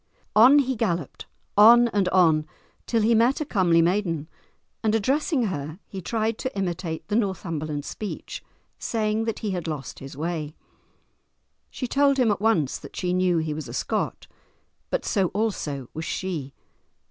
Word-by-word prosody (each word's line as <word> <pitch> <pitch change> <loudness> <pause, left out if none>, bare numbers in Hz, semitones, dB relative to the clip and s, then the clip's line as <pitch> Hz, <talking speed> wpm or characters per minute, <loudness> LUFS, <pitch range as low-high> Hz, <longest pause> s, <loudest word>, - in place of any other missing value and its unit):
On 250 +7 +8
he 265 -2 +2
galloped, 175 - -2 0.3
on 235 +3 +8
and 200 -4 +1
on, 160 -5 +3 0.4
till 230 -2 +1
he 230 +2 +4
met 235 +4 +3
a 305 - -2
comely 175 - +3
maiden, 170 -4 0 0.6
and 220 0 +2
addressing 270 - +1
her 155 -6 -3
he 195 - -7
tried 220 +3 -1
to 260 -5 -4
imitate 175 -3 -3
the 205 - -1
Northumberland 165 -8 -2
speech, 210 - -6 0.4
saying 220 -1 -1
that 225 -2 -3
he 205 - 0
had 175 -3 -3
lost 150 -5 -5
his 135 0 -10
way. 155 -1 -3 1.1
She 255 - -5
told 275 +2 +3
him 245 -5 +3
at 200 - -2
once 180 -11 +1
that - - -12
she 180 -1 -1
knew 180 -1 +2
he 160 -1 -1
was 155 +1 -6
a - - -7
Scot, - - -2 0.6
but - - -2
so 195 -4 +1
also 150 - -2
was 160 +1 -5
she. 155 -8 -4
190 Hz, 160 wpm, -25 LUFS, 160-225 Hz, 1.1 s, On